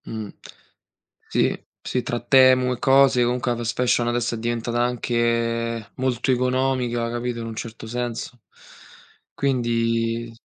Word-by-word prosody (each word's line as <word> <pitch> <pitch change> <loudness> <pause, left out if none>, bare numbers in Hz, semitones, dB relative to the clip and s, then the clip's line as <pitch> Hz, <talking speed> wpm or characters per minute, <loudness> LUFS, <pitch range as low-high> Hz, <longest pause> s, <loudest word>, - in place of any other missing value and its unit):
Mh. 110 -2 -6 1.0
Sì, - - 0 0.2
sì, 125 - -2
tra 120 0 -2
Temu 130 0 +5
e 125 - -7
cose, 135 -2 +5
comunque 120 0 0
la 120 - -1
fast 115 0 -2
fashion 120 -1 +2
adesso 120 0 0
è - - -5
diventata 120 +1 -1
anche 115 -2 -1
molto 130 -1 0
economica, 125 -2 0
capito, 120 0 -3
in 115 - -5
un 115 - -6
certo 115 0 -7
senso. 120 +1 -4 1.0
Quindi 115 -3 0
s 115 - -20
120 Hz, 135 wpm, -23 LUFS, 115-125 Hz, 1.0 s, Temu